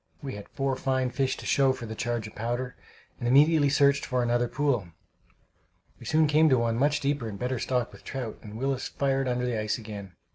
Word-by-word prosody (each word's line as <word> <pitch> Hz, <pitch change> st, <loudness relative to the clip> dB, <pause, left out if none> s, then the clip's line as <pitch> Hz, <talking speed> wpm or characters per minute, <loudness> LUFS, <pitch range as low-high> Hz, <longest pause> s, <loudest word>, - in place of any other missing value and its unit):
We 135 Hz, -, -4 dB
had 100 Hz, 0 st, -9 dB
four 135 Hz, -1 st, -1 dB
fine 130 Hz, -1 st, 0 dB
fish 130 Hz, +1 st, 0 dB
to -, -, -9 dB
show 135 Hz, -1 st, +3 dB
for 120 Hz, -, -7 dB
the 110 Hz, -, -6 dB
charge 120 Hz, 0 st, -2 dB
of 110 Hz, -, -9 dB
powder, 120 Hz, +3 st, -3 dB, 0.4 s
and 120 Hz, -, -2 dB
immediately 145 Hz, +3 st, +5 dB
searched 140 Hz, 0 st, +3 dB
for 125 Hz, -1 st, 0 dB
another 120 Hz, 0 st, +1 dB
pool. 130 Hz, -8 st, 0 dB, 1.1 s
We -, -, -10 dB
soon 160 Hz, 0 st, +4 dB
came 155 Hz, +1 st, +4 dB
to 130 Hz, -, +4 dB
one 115 Hz, -1 st, +1 dB
much 145 Hz, +2 st, +2 dB
deeper 140 Hz, -5 st, -1 dB
and 100 Hz, -, -7 dB
better 125 Hz, +1 st, -2 dB
stocked 125 Hz, -2 st, -1 dB
with -, -, -14 dB
trout, 125 Hz, -5 st, -5 dB
and 105 Hz, 0 st, -9 dB
Willis 135 Hz, +1 st, -1 dB
fired 135 Hz, -1 st, 0 dB
under 125 Hz, 0 st, 0 dB
the 120 Hz, -3 st, -1 dB
ice 105 Hz, 0 st, -1 dB
again. 100 Hz, -4 st, -8 dB
125 Hz, 215 wpm, -27 LUFS, 115-140 Hz, 1.1 s, immediately